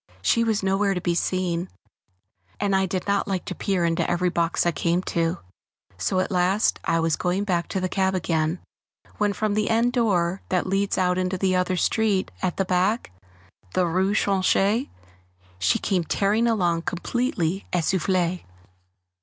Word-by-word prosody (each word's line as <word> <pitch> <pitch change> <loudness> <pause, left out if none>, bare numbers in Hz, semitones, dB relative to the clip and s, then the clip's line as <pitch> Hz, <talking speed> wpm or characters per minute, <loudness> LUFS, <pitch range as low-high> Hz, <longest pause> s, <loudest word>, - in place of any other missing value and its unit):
She 230 - +3
was 220 -3 0
nowhere 195 +1 +1
to - - -1
be 175 -1 0
seen, 180 0 -1 0.9
and 200 -1 +1
I 190 0 +2
did 185 0 -3
not 200 0 0
like 190 -2 -2
to - - -4
peer 190 -4 0
into 165 -1 0
every 175 +1 +1
box 170 -1 0
I 175 - +3
came 170 +4 0
to, 165 +1 0 0.6
so 90 - 0
at 185 - -1
last 185 +3 +2
I 165 0 +1
was 165 -1 +1
going 180 +2 -1
back 175 -4 -1
to 190 - -2
the 185 - -1
cab 190 0 0
again, 165 -1 0 0.6
when 210 -1 +2
from 215 +1 -1
the 215 0 0
end 235 +2 +2
door 190 -7 +1
that 185 -1 +1
leads 195 +1 0
out 180 0 +1
into 185 0 -1
the 185 0 +1
other 180 0 0
street 205 0 +1
at 180 -2 -1
the 195 - +1
back, 185 - 0 0.6
the 185 - +3
rue 190 +4 +1
Tronchet, 200 +5 +2 0.7
she 90 0 +2
came 185 -3 0
tearing 205 +7 +1
along 175 -7 +1
completely 190 -1 -2
essoufflée. 180 0 0
185 Hz, 170 wpm, -24 LUFS, 175-200 Hz, 0.9 s, She